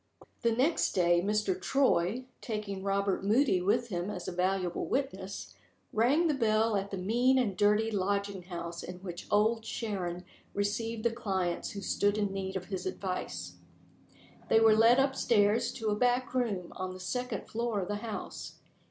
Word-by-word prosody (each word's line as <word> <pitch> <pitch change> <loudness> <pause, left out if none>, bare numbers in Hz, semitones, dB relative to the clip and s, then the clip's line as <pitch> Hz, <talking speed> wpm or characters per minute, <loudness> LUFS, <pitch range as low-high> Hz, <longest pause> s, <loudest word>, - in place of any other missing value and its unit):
THE 235 - +3
next 265 +9 +2
day, 175 -2 +3
Mr. 210 - 0
Troy 255 - +2 0.2
(taking 210 -4 -4
Robert 195 0 0
Moody 215 -2 +3
with 210 +6 +1
him 180 0 -2
as 180 -4 -5
a - - -2
valuable 180 0 -1
witness) 200 -8 -3 0.4
rang 265 +10 +3
the 315 - +3
bell 225 -3 +2
at 200 0 -1
the 195 - -4
mean 240 +8 +3
and 225 -7 +1
dirty 210 +2 +3
lodging 200 -1 -1
house 170 -1 -6
in 180 - -7
which 175 -2 -7
Old 220 +2 +3
Sharon 185 -6 -4 0.3
received 215 +2 -1
the 235 - +2
clients 190 -7 -2
who 200 - -6
stood 205 +2 +1
in 205 -2 0
need 190 0 -4
of 185 -1 -3
his 190 -1 -4
advice. 90 - -4 0.9
They 225 - +6
were 225 -1 +6
led 230 +4 +6
up 270 0 +2
stairs 230 +2 +3
to 225 -3 -2
a 210 - +1
back 245 +3 +1
room 210 -9 -1
on 185 0 -4
the - - -9
second 245 +3 -3
floor 230 -2 -1
of 185 - -3
the 205 +1 -2
house. 220 0 -6
205 Hz, 170 wpm, -31 LUFS, 190-230 Hz, 0.9 s, They